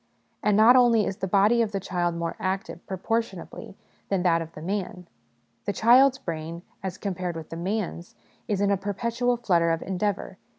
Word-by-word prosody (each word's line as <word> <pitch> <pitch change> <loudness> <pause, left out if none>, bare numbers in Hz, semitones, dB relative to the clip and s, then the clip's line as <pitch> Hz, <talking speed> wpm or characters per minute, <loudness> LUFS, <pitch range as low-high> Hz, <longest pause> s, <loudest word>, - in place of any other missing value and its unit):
And 210 -1 +2
not 225 +4 +7
only 235 -4 +5
is 190 - -3
the 190 - -3
body 205 +5 +4
of 220 -2 -1
the 195 - 0
child 175 -2 -1
more 170 0 -3
active, 190 -2 -3
proportion 195 +1 -2
ably, 190 - -10 0.3
than 195 -3 0
that 165 -2 +3
of 165 0 -7
the 155 - -10
man: 185 -1 -3 0.6
the 200 - -1
child's 255 +5 +5
brain 165 -4 -6 0.2
as 190 0 -5
compared 185 -3 -3
with 160 -1 -8
the - - -4
man's 180 0 -4 0.3
is 200 -2 -1
in 200 0 +2
a 200 - +2
perpetual 235 +5 -1
flutter 175 -8 +2
of 165 0 0
endeavour. 195 +2 -3
195 Hz, 185 wpm, -26 LUFS, 175-215 Hz, 0.6 s, not